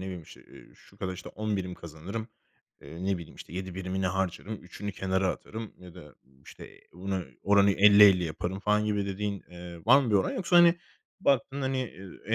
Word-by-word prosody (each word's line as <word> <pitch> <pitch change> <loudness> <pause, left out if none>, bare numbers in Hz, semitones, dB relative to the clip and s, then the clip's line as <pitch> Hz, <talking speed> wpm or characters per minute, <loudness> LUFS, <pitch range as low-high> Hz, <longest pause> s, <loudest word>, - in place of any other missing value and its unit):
bileyim, 90 -3 -6
işte, - - -15
eee, - - -16
şu - - -21
kadar, 95 -1 -3
işte, 90 - -9
10 110 -1 -2
birim 90 -1 -4
kazanırım. 90 +9 -7 0.5
Eee, 80 +6 -8
ne 95 -2 0
bileyim, 85 - -11
işte, - - -11
7 95 -1 -5
birimini 95 0 -2
harcarım, 95 +3 -2
3'ünü 105 +2 -6
kenara 95 0 0
atarım 110 +3 -6
ya 90 -2 -13
da, 75 -6 -13 0.3
işte, - - -13
bunu 95 0 -3 0.2
oranı 100 0 +5
50-50 100 -2 +7
yaparım, 90 +4 -4
falan, 105 +1 +2
gibi 105 -2 0
dediğin, 100 0 -3
eee, 85 -1 -10
var 135 +4 +8
mı 120 - -2
bir 105 - +2
oran 95 - +1
yoksa, 180 -1 +1
hani, 175 0 +8 0.5
baktığında, 135 - +1
hani, 130 0 -1
eee, 95 -6 -10
95 Hz, 190 wpm, -28 LUFS, 90-105 Hz, 0.5 s, var